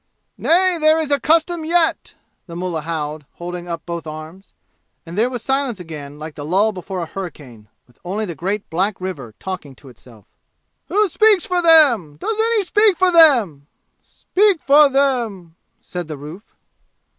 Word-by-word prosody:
"Nay, 360 Hz, +1 st, +2 dB
there 310 Hz, +1 st, +4 dB
is 315 Hz, -3 st, -2 dB
a 285 Hz, -, +3 dB
custom 325 Hz, +2 st, +1 dB
yet!" 330 Hz, 0 st, 0 dB, 0.3 s
the 170 Hz, -, -9 dB
mullah 175 Hz, -2 st, -3 dB
howled, 155 Hz, -1 st, -5 dB
holding 175 Hz, 0 st, -7 dB
up 170 Hz, -1 st, -5 dB
both 170 Hz, -2 st, -6 dB
arms. 155 Hz, +5 st, -10 dB, 0.5 s
And 165 Hz, +1 st, -9 dB
there 225 Hz, +5 st, +1 dB
was 245 Hz, -3 st, -6 dB
silence 265 Hz, -5 st, -1 dB
again 150 Hz, -4 st, -9 dB
like 155 Hz, +1 st, -8 dB
the 145 Hz, -, -8 dB
lull 195 Hz, +8 st, +1 dB
before 185 Hz, -1 st, -6 dB
a -, -, -3 dB
hurricane, 145 Hz, -, -9 dB, 0.2 s
with 125 Hz, -3 st, -28 dB
only 200 Hz, +5 st, -3 dB
the 175 Hz, -, -5 dB
great 195 Hz, +7 st, -4 dB
black 190 Hz, +5 st, -1 dB
river 145 Hz, -, -7 dB
talking 180 Hz, -8 st, -7 dB
to 135 Hz, +1 st, -16 dB
itself. 115 Hz, -4 st, -17 dB, 0.6 s
"Who 420 Hz, +1 st, +2 dB
speaks 420 Hz, +1 st, +3 dB
for 360 Hz, -1 st, 0 dB
them? 270 Hz, -, +4 dB
Does 440 Hz, -, -3 dB
any 450 Hz, -1 st, +2 dB
speak 415 Hz, 0 st, +3 dB
for 370 Hz, -1 st, +3 dB
them?" 235 Hz, -, +4 dB, 0.3 s
"Speak 400 Hz, -2 st, 0 dB
for 290 Hz, +1 st, +6 dB
them?" 235 Hz, -11 st, -1 dB, 0.3 s
said 175 Hz, -2 st, -6 dB
the 155 Hz, -2 st, -7 dB
roof. 155 Hz, +9 st, -12 dB
190 Hz, 170 wpm, -19 LUFS, -, 0.6 s, for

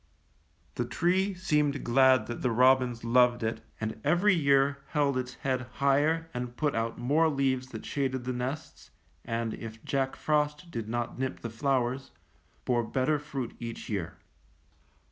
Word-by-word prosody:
The -, -, -2 dB
tree 190 Hz, +3 st, +1 dB
seemed 150 Hz, -6 st, +1 dB
glad 130 Hz, +1 st, +5 dB
that 120 Hz, -, -6 dB
the 125 Hz, -, +1 dB
robins 125 Hz, 0 st, +3 dB
loved 120 Hz, 0 st, +4 dB
it, 110 Hz, 0 st, -2 dB, 0.2 s
and 110 Hz, 0 st, -4 dB
every 175 Hz, +7 st, +4 dB
year 140 Hz, -3 st, +3 dB
held 145 Hz, -3 st, +1 dB
its 130 Hz, 0 st, -3 dB
head 130 Hz, -2 st, -2 dB
higher 150 Hz, +4 st, +2 dB
and 125 Hz, 0 st, -5 dB
put 150 Hz, -2 st, +1 dB
out 115 Hz, 0 st, -2 dB
more 150 Hz, +7 st, +3 dB
leaves 135 Hz, -3 st, 0 dB
that 115 Hz, -4 st, -8 dB
shaded 130 Hz, -3 st, -1 dB
the 130 Hz, +1 st, -2 dB
nests, 130 Hz, +5 st, -5 dB, 0.3 s
and, 115 Hz, -1 st, -2 dB
if 110 Hz, -1 st, -9 dB
Jack 135 Hz, -1 st, 0 dB
Frost 150 Hz, +2 st, 0 dB
did 115 Hz, -7 st, -4 dB
not 120 Hz, +1 st, -3 dB
nip 130 Hz, 0 st, -3 dB
the 115 Hz, -, -5 dB
flowers, 130 Hz, +1 st, 0 dB, 0.6 s
bore 120 Hz, -2 st, +2 dB
better 130 Hz, +6 st, 0 dB
fruit 140 Hz, -4 st, -5 dB
each 115 Hz, -1 st, -6 dB
year. 95 Hz, -6 st, -3 dB
130 Hz, 155 wpm, -29 LUFS, 120-145 Hz, 0.6 s, glad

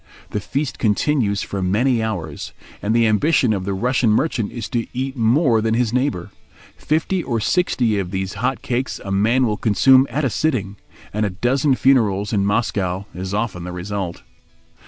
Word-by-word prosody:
The 105 Hz, -, -1 dB
feast 140 Hz, +6 st, -3 dB
continues 110 Hz, -1 st, +1 dB
for 100 Hz, -, -4 dB
many 115 Hz, +6 st, +1 dB
hours, 90 Hz, -9 st, -4 dB, 0.3 s
and 110 Hz, +2 st, 0 dB
the 115 Hz, -1 st, +4 dB
ambition 115 Hz, +2 st, +3 dB
of 95 Hz, -2 st, -3 dB
the 100 Hz, 0 st, -2 dB
Russian 125 Hz, +3 st, +1 dB
merchant 110 Hz, -1 st, +1 dB
is 115 Hz, -4 st, -5 dB
to 120 Hz, -3 st, -2 dB
eat 130 Hz, +1 st, -2 dB
more 120 Hz, 0 st, +3 dB
than 110 Hz, 0 st, +1 dB
his 120 Hz, -1 st, 0 dB
neighbour. 125 Hz, -9 st, -1 dB, 0.4 s
Fifty 160 Hz, +4 st, -1 dB
or 120 Hz, -7 st, -2 dB
sixty 115 Hz, -, +1 dB
of 95 Hz, -2 st, -3 dB
these 95 Hz, 0 st, -3 dB
hot 130 Hz, +1 st, -1 dB
cakes 125 Hz, +1 st, -2 dB
a 100 Hz, -, -4 dB
man 115 Hz, +7 st, +3 dB
will 105 Hz, -3 st, -1 dB
consume 130 Hz, +5 st, +4 dB
at 150 Hz, 0 st, -1 dB
a -, -, +2 dB
sitting, 110 Hz, -11 st, -1 dB, 0.4 s
and 105 Hz, +1 st, 0 dB
a 105 Hz, -, +1 dB
dozen 130 Hz, +9 st, +1 dB
funerals 110 Hz, -7 st, +2 dB
in 100 Hz, -1 st, +1 dB
Moscow 100 Hz, -3 st, -1 dB
is 95 Hz, +1 st, -5 dB
often 105 Hz, -5 st, -2 dB
the 90 Hz, -, -6 dB
result. 90 Hz, 0 st, -5 dB
110 Hz, 180 wpm, -20 LUFS, 100-130 Hz, 0.4 s, the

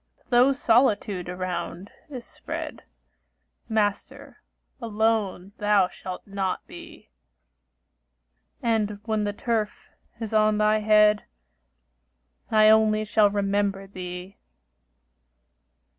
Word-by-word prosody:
Though 245 Hz, +2 st, +5 dB
solitude 225 Hz, -8 st, +1 dB
around 180 Hz, +1 st, -5 dB, 0.2 s
is 255 Hz, -4 st, -8 dB
spread, -, -, -7 dB, 0.8 s
Master, 210 Hz, -2 st, -2 dB, 0.4 s
alone 215 Hz, -4 st, -1 dB
thou 205 Hz, -3 st, +3 dB
shalt 185 Hz, -1 st, -8 dB
not 195 Hz, -2 st, -3 dB
be; -, -, -13 dB, 1.5 s
And 215 Hz, -3 st, 0 dB
when 215 Hz, -1 st, -1 dB
the 205 Hz, -, -1 dB
turf 220 Hz, -1 st, -3 dB, 0.3 s
is 225 Hz, -2 st, -5 dB
on 215 Hz, -1 st, +3 dB
thy 215 Hz, 0 st, +3 dB
head, 210 Hz, 0 st, +4 dB, 1.2 s
I 215 Hz, -1 st, +5 dB
only 215 Hz, 0 st, +4 dB
shall 215 Hz, -1 st, +3 dB
remember 200 Hz, -1 st, -1 dB
thee. 180 Hz, 0 st, -8 dB
210 Hz, 90 wpm, -25 LUFS, 195-220 Hz, 1.5 s, Though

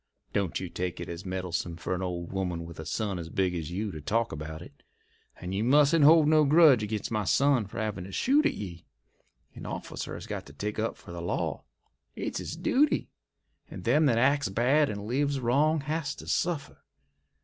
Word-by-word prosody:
Don't 100 Hz, -4 st, 0 dB
you 95 Hz, -, -4 dB
take 90 Hz, 0 st, -4 dB
it -, -, -5 dB
as 85 Hz, +3 st, -7 dB
meddlesome 90 Hz, -2 st, -3 dB
fer 85 Hz, -, -3 dB
an 90 Hz, -, -2 dB
old 85 Hz, -2 st, -4 dB
woman 90 Hz, -3 st, -2 dB
with 85 Hz, -1 st, -10 dB
a 80 Hz, -, -6 dB
son 100 Hz, -1 st, -2 dB
as 80 Hz, -1 st, -7 dB
big 95 Hz, +1 st, 0 dB
as 80 Hz, -3 st, -4 dB
you 100 Hz, +4 st, -3 dB
to 75 Hz, -, -8 dB
talk 115 Hz, +10 st, 0 dB
about 80 Hz, +1 st, -6 dB
it. 75 Hz, -4 st, -14 dB, 0.6 s
And 90 Hz, +1 st, -5 dB
you 100 Hz, +3 st, 0 dB
mustn't 145 Hz, +5 st, +5 dB
hold 155 Hz, +1 st, +7 dB
no 155 Hz, 0 st, +5 dB
grudge 150 Hz, -4 st, +6 dB
ag'in' 105 Hz, 0 st, -2 dB
my 105 Hz, -1 st, 0 dB
son 135 Hz, +1 st, +3 dB
for 100 Hz, -, -10 dB
havin' 105 Hz, -5 st, -3 dB
to 95 Hz, -, -9 dB
shoot 290 Hz, -, +3 dB
at -, -, -2 dB
ye. 85 Hz, -4 st, -8 dB, 0.7 s
A -, -, -9 dB
officer -, -, -5 dB
has -, -, -8 dB
got -, -, -6 dB
to 70 Hz, -, -13 dB
take 105 Hz, +8 st, -4 dB
up 115 Hz, +1 st, -1 dB
for -, -, -12 dB
the 85 Hz, 0 st, -6 dB
law—it's 85 Hz, -, -5 dB
his -, -, -5 dB
duty—and 275 Hz, -, -2 dB
them 145 Hz, +6 st, +4 dB
that 120 Hz, -4 st, +3 dB
acts 140 Hz, +1 st, +3 dB
bad 130 Hz, +9 st, +3 dB
and 100 Hz, -1 st, -5 dB
lives 140 Hz, +4 st, 0 dB
wrong 145 Hz, +6 st, +2 dB
has 150 Hz, -1 st, -2 dB
to -, -, -11 dB
suffer. 165 Hz, -5 st, -2 dB
105 Hz, 200 wpm, -28 LUFS, 90-145 Hz, 0.7 s, hold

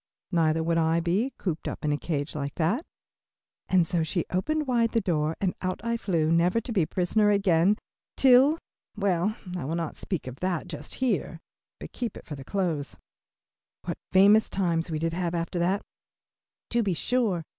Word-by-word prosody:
Neither 160 Hz, -2 st, +2 dB
would 165 Hz, 0 st, +1 dB
I 165 Hz, +1 st, +2 dB
be, 185 Hz, +10 st, 0 dB
cooped 165 Hz, -5 st, -3 dB
up -, -, -5 dB
in 150 Hz, -, +2 dB
a -, -, +2 dB
cage 145 Hz, -3 st, -3 dB
like 140 Hz, -1 st, -4 dB
that," 180 Hz, -, +1 dB, 0.9 s
and 180 Hz, -2 st, +4 dB
so 170 Hz, 0 st, 0 dB
she 160 Hz, +2 st, -1 dB
opened 305 Hz, +12 st, 0 dB
wide 235 Hz, -3 st, +1 dB
the 230 Hz, -, +3 dB
door 160 Hz, -6 st, 0 dB
and 190 Hz, -3 st, 0 dB
out 185 Hz, 0 st, -2 dB
I 235 Hz, 0 st, +1 dB
flew, 165 Hz, -8 st, 0 dB
never 175 Hz, +6 st, +3 dB
to 230 Hz, -, -6 dB
be 205 Hz, -5 st, +2 dB
a 155 Hz, -, 0 dB
prisoner 205 Hz, +3 st, +2 dB
again 195 Hz, -1 st, +3 dB, 0.4 s
till, 270 Hz, +4 st, +6 dB, 0.4 s
well, 200 Hz, +1 st, +1 dB, 0.2 s
I 175 Hz, -, -3 dB
will 155 Hz, +5 st, -2 dB
not 165 Hz, -2 st, -3 dB
speak 185 Hz, -6 st, -4 dB
of 130 Hz, +1 st, -8 dB
that 185 Hz, -2 st, -1 dB
just 150 Hz, -4 st, -7 dB
here, 215 Hz, -9 st, -1 dB, 0.4 s
but -, -, -8 dB
keep 240 Hz, -3 st, -4 dB
it -, -, -12 dB
for 155 Hz, -, -7 dB
the 135 Hz, -2 st, -7 dB
close. 165 Hz, -4 st, -2 dB, 0.9 s
What -, -, -4 dB
famous 205 Hz, +3 st, +6 dB
times 170 Hz, -3 st, 0 dB
we 160 Hz, -, -1 dB
did 165 Hz, +1 st, -1 dB
have 175 Hz, -1 st, -1 dB
after 170 Hz, +1 st, -2 dB
that, 190 Hz, +4 st, +1 dB, 0.9 s
to 235 Hz, -, +3 dB
be 195 Hz, -5 st, 0 dB
sure. 215 Hz, -4 st, 0 dB
180 Hz, 190 wpm, -27 LUFS, 165-210 Hz, 0.9 s, till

